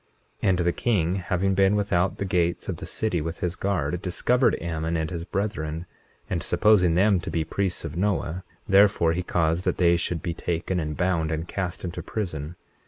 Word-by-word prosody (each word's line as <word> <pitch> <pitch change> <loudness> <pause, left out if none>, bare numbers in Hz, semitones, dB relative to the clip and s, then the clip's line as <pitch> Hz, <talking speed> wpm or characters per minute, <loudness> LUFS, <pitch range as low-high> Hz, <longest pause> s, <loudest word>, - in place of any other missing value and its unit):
21:23 - - +2
And 95 - +3
the 85 0 +2
king 95 -5 +1
having 95 +1 0
been 95 +1 +4
without 95 -3 +1
the 100 - -2
gates 85 -2 0
of - - -3
the - - -7
city 105 -7 -1
with 80 +2 -5
his 90 -1 -1
guard, 90 -4 -1
discovered 120 +8 +2
Ammon 80 0 -2
and 80 +1 -2
his 85 -1 -4
brethren; 85 -6 -3 0.4
and - - -2
supposing 90 -6 +3
them 100 +1 +4
to 85 - -5
be 80 0 0
priests 90 +2 -2
of 80 -1 -5
Noah 95 -2 -1 0.2
therefore 95 -4 +5
he 90 - -1
caused 85 -1 0
that - - 0
they 85 -1 +4
should 85 -2 -2
be 85 - -2
taken, 90 +2 -2
and 75 -2 -3
bound, 90 -3 +1
and 80 +2 -2
cast 95 -2 -4
into 85 0 -4
prison. 85 -6 -4
90 Hz, 195 wpm, -25 LUFS, 80-95 Hz, 0.4 s, therefore